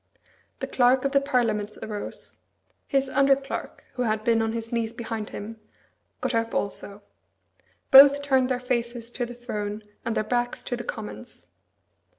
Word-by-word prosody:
The - - 0
Clerk 255 +1 +3
of 275 - +1
the 275 0 +4
Parliaments 225 -6 0
arose. 210 -1 -6 0.5
His 275 -1 +1
under 275 +1 +4
clerk, 275 0 -7
who 250 - -4
had 215 -2 0
been 230 0 +3
on 225 0 -1
his 230 0 -5
knees 230 -1 -1
behind 225 -3 -5
him, 220 +2 -7 0.6
got - - -1
up 230 0 0
also. 200 0 -4 0.9
Both 280 +1 +9
turned 265 -2 +2
their 255 -1 0
faces 240 -1 -3
to 245 0 -3
the 245 - -9
throne, 210 -3 -5 0.2
and 230 - -2
their - - +1
backs 240 +2 -1
to 245 - -2
the 240 - -6
Commons. 225 +2 -8
240 Hz, 160 wpm, -26 LUFS, 220-255 Hz, 0.9 s, Both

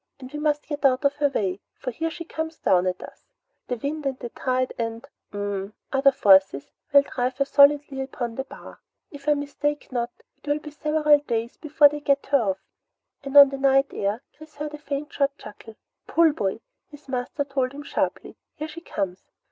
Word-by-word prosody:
"And 260 +1 -11
we 295 - -4
must 300 -1 0
get 295 -1 -5
out 265 +1 +3
of 280 +1 +2
her 290 -1 +3
way, 195 -7 -1 0.2
for 255 - -5
here 325 +7 -2
she 335 +1 -8
comes 320 0 -5
down 180 0 +2
at 185 0 -3
us. - - -13 0.4
The 245 - -2
wind 285 +4 -3
and 265 -1 -2
the 240 - -7
tide 255 +1 -1
and 230 +2 -4 0.2
hm 205 -1 -3
m 205 - -15 0.2
other 275 +1 +5
forces 190 - +4 0.2
will 280 -1 +7
drive 255 -1 -2
her 275 - +2
solidly 280 -1 +4
upon 250 -3 -4
the 265 - -3
bar. 270 - -13 0.3
If 285 0 -5
I 295 - +5
mistake 290 0 -3
not, 240 -1 -1 0.3
it - - -21
will 290 0 +2
be 300 0 -9
several 300 0 +3
days 235 -4 -3
before 300 -1 +5
they 295 +1 -4
get 280 -1 +1
her 280 -3 +5
off," 195 -4 0 0.7
and 275 +1 0
on 280 -1 +11
the 275 0 -6
night 270 0 +3
air 205 +5 -2
Chris 310 0 -15
heard 300 +1 -5
a 300 - -7
faint 295 0 -5
short 280 0 0
chuckle. 220 +1 -12 0.3
"Pull, 330 -1 +4
boy!" 205 -5 -2 0.3
his 290 -1 -15
master 255 +2 -2
told 270 -2 -1
him 290 +1 -9
sharply. - - -3 0.2
"Here 310 - -5
she 315 +2 -10
comes!" 190 - -5
275 Hz, 205 wpm, -24 LUFS, 240-295 Hz, 0.7 s, on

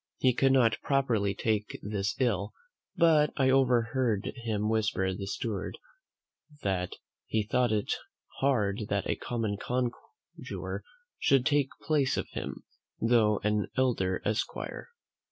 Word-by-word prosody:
He 130 -1 +3
could 135 +2 +3
not 120 -4 +3
properly 115 -8 +1
take 105 0 -1
this 100 -1 -2
ill, 110 -5 0 0.4
but 160 -3 +5
I 130 -1 +4
overheard 125 -4 +2
him 110 -3 -1
whisper 105 -4 +1
the 100 +1 -5
steward, 100 -1 -3 0.9
"that 90 -2 -1 0.3
he 110 -1 +1
thought 120 +3 +1
it 105 -1 +1 0.5
hard 105 -6 +1
that - - 0
a - - +1
common 110 -4 -2
conjuror 125 - -5 0.4
should 135 -2 +3
take 145 -3 +3
place 145 -4 +2
of - - -2
him, - - -5 0.4
though 115 -3 +4
an 105 0 +1
elder 105 -8 +1
esquire." 105 +1 -2
115 Hz, 125 wpm, -30 LUFS, 105-130 Hz, 0.9 s, but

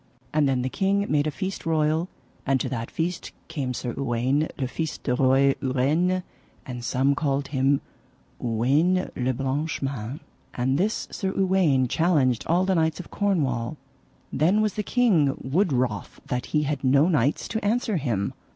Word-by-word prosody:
And 150 -2 +3
then 130 -2 +1
the - - 0
king 200 +4 +1
made 150 0 +2
a - - +2
feast 190 +5 -4
royal, 160 +2 +1 0.3
and 135 -1 +1
to - - -1
that 115 -3 -4
feast 170 +2 -3 0.2
came 135 -5 -3
Sir 120 -1 -4
Uwaine 135 +3 0
le 130 - -1
Fise 160 +4 -3
de 125 - -2
Roy 135 +2 +4
Ureine, 155 +8 +1 0.4
and 125 -2 -6
some 130 +3 +2
called 140 -1 -1
him 135 0 +2 0.6
Uwaine 140 +11 +1
le 125 0 0
Blanchemains. 135 -1 -3 0.4
And 130 +3 +1
this 210 +4 0
Sir 190 -1 -2
Uwaine 185 -9 +3
challenged 140 -6 +2
all 175 +3 +3
the 190 - +2
knights 160 -2 +1
of 180 - -9
Cornwall. 150 - 0 0.6
Then 180 +8 +3
was 215 -2 +1
the 210 - -2
king 195 - +2
wood 170 +7 +1
wroth 120 -7 -1
that 125 0 -3
he 150 -1 +1
had 145 -2 -2
no 140 +4 +4
knights 145 -5 +1
to 220 - -3
answer 220 -1 +1
him. 115 -10 -1
145 Hz, 165 wpm, -25 LUFS, 130-175 Hz, 0.6 s, Roy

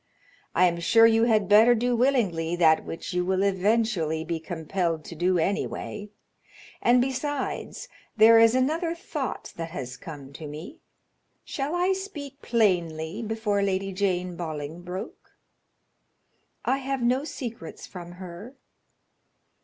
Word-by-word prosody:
I 185 - +5
am 170 -1 +1
sure 225 +7 +5
you 225 0 +5
had 215 -4 +2
better 220 +4 +7
do 245 +2 +1
willingly 205 -10 +1
that 160 -2 +4
which 165 +3 -6
you 180 0 +1
will 190 +1 +1
eventually 195 -5 +1
be 165 0 -3
compelled 165 0 -2
to 170 - -8
do 180 +3 +2
anyway; 200 +3 -2 0.7
and 245 +1 +5
besides, 270 - -3 0.3
there 225 +1 +8
is 230 +1 +6
another 320 +6 +1
thought 340 - -5
that 165 0 -4
has 130 -7 -6
come 140 -2 -10
to 155 +2 -8
me; 160 - -9 0.7
shall 285 +4 -3
I 360 +2 +2
speak 295 -8 -7
plainly 175 -5 0
before 220 -2 -1
Lady 195 0 -1
Jane 185 -2 -1
Bolingbroke?" 170 +3 -7 1.3
"I 270 - +1
have 270 -1 -3
no 255 +3 +2
secrets 235 - -7
from 175 -2 -9
her." 185 +7 -10
200 Hz, 130 wpm, -26 LUFS, 170-245 Hz, 1.3 s, there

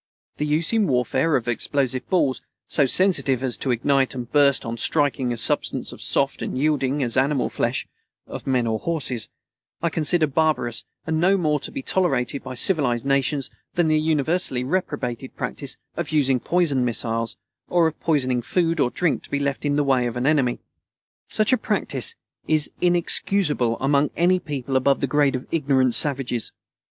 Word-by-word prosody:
The 150 - -1
use 160 +6 +1
in 220 -3 +3
warfare 130 +3 +1
of 120 - -1
explosive 130 +2 -1
balls, 145 -8 +1 0.3
so 140 -3 +2
sensitive 140 -6 +2
as 130 -3 0
to 135 - -3
ignite 135 +2 +1
and 125 -2 -5
burst 140 -3 +3
on 115 0 -4
striking 140 -4 +1
a 120 - -3
substance - - 0
as - - -9
soft - - 0
and - - -3
yielding 140 -1 +1
as 120 -2 -1
animal 135 0 +1
flesh - - -2 0.4
(of - - -8
men 130 -3 +1
or 110 -1 -1
horses), 140 -9 -1 0.5
I 170 0 -1
consider 160 +1 +1
barbarous 150 -5 0 0.2
and 160 0 -1
no 190 +3 +4
more 150 -4 +1
to - - -7
be 275 - -6
tolerated 140 -8 0
by 130 - -7
civilized 125 -5 +1
nations 140 0 0 0.2
than 175 -2 +2
the 155 0 +3
universally 155 -3 0
reprobated 130 -5 -3
practice 140 -2 -5 0.2
of 170 -3 -4
using 135 -4 +2
poisoned 155 -4 +1
missiles, 115 -1 -2 0.3
or 175 -1 +3
of 160 -1 -2
poisoning 130 -6 +1
food 165 +5 0
or 125 - +3
drink 175 +4 0
to - - -13
be 145 - -1
left 140 0 -2
in 145 0 +1
the 145 - +2
way 130 -3 +2
of 120 0 -4
an 125 - -1
enemy. 140 -5 +2 0.7
Such 215 +4 +2
a - - +5
practice 460 - -1 0.3
is 155 -1 +2
inexcusable 175 - +2
among 140 +2 +2
any 180 +2 +3
people 140 -5 -4
above 135 +1 +2
the - - 0
grade 140 0 +2
of 130 - -5
ignorant 135 -5 +2
savages. 130 -5 +1
140 Hz, 175 wpm, -23 LUFS, 130-160 Hz, 0.7 s, a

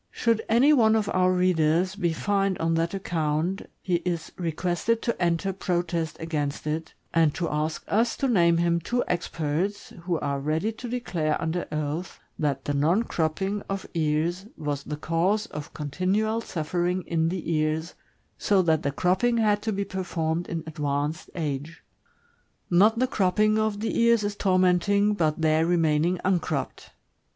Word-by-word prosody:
Should 230 -2 +1
any 250 +7 +5
one 220 -5 +5
of 215 -2 0
our 185 0 +3
readers 180 0 +2
be 175 -5 0
fined 195 +2 0
on 165 0 0
that 165 +3 0
account, 170 0 -1 0.2
he 180 -2 +1
is 170 -1 -3
requested 175 +6 -1
to 235 - -2
enter 175 +3 +1
protest 175 -4 -2
against 150 -3 -3
ft, 155 +1 -3 0.2
and 160 -3 +3
to 175 - -1
ask 155 +1 -2
us 230 +3 +1
to 275 - 0
name 170 -8 +4
him 170 0 +2
two 245 +9 -1
experts 175 +3 -2
who 175 -2 0
are 140 -1 -2
ready 155 +9 0
to 230 +2 -8
declare 175 -11 -1
under 170 +2 -2
oath 155 +3 -3 0.2
that 140 -3 -1
the 145 - -1
non 160 +10 +2
cropping 190 +3 -1
of 195 0 -3
ea's 165 +4 0
was 145 -3 -3
the 150 +1 -6
cause 180 +8 +1
of 150 -9 -8
continual 190 +9 0
suffering 175 0 -2
in 165 -1 0
the 170 -2 -3
ears, 155 +2 -1 0.5
so 195 -2 +3
that 160 -2 +2
the 140 - -1
cropping 190 - +1
had 210 -2 +2
to 220 - -1
be 200 0 -2
performed 175 -3 -2
in 165 -1 -4
advanced 150 0 -2
age. 150 0 -4 0.9
Not 210 +6 +5
the 255 - +3
cropping 215 -1 +2
of 215 -1 -1
the 225 - -1
ears 235 -2 +4
is 205 0 -2
tormenting, 190 +2 +3
but 160 -5 0
their 155 0 +3
remaining 165 0 +2
uncropped. 165 -7 -1
175 Hz, 160 wpm, -26 LUFS, 160-200 Hz, 0.9 s, any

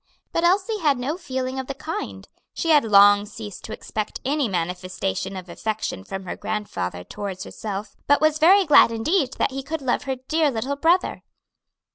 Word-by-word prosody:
But 335 - 0
Elsie 390 +5 +2
had 295 -6 +2
no 265 +6 -2
feeling 260 -6 -4
of 260 - -5
the 275 - -4
kind; 100 - -6 0.3
she 330 - -2
had 295 -2 +6
long 205 -1 +6
ceased 205 -2 -9
to - - -8
expect 215 -1 -4
any 280 -2 +1
manifestation 180 - -3
of 185 -1 -8
affection 210 - -4
from 190 - -6
her 185 - -5
grandfather 95 - -4
towards 195 - -6
herself, 205 -1 -6
but 285 - +5
was 310 0 +2
very 380 +5 +6
glad 295 -6 +7
indeed 270 - 0
that - - 0
he 270 +1 -4
could 310 +1 -5
love 255 +1 0
her 265 -1 -1
dear 300 +4 +1
little 260 +3 -2
brother. 335 +5 +2
255 Hz, 180 wpm, -23 LUFS, 200-305 Hz, 0.3 s, glad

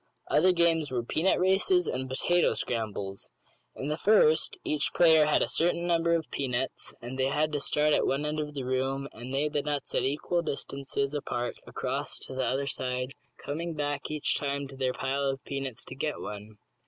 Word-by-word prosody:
Other 180 +5 +5
games 170 -3 +2
were 125 -2 -1
"peanut 165 +10 +2
races" 195 - +3
and 130 0 -3
"potato 175 +7 +2
scrambles." 105 -4 -3 0.5
In 135 - -4
the 150 +2 -2
first 160 -7 +4
each 150 -1 0
player 160 -3 +6
had 150 - +4
a - - 0
certain 170 +1 +1
number 170 -1 +3
of 165 -2 -3
peanuts 130 -1 -2
and 130 +2 -6
they 130 - +3
had 150 +3 +1
to 145 - -1
start 150 +1 +2
at - - +3
one 140 +2 0
end 150 +1 -1
of 150 -1 -4
the 135 - -3
room, 135 +2 -1
and 120 +3 -8
lay 140 +3 +1
the 145 -1 0
nuts 145 -1 -3
at - - +2
equal 150 +5 0
distances 140 -2 -3
apart 120 -4 -2
across - - -2
to - - -8
the 130 0 -1
other 135 +2 0
side, 125 -1 -2 0.3
coming 165 +3 -4
back 145 -1 -2
each 150 -1 0
time 140 0 -2
to 135 - -10
their 130 -1 0
pile 135 +2 -1
of 135 -1 -1
peanuts 135 -4 -4
to - - -8
get 150 +2 -2
one. 105 +1 -7
140 Hz, 195 wpm, -29 LUFS, 130-155 Hz, 0.5 s, player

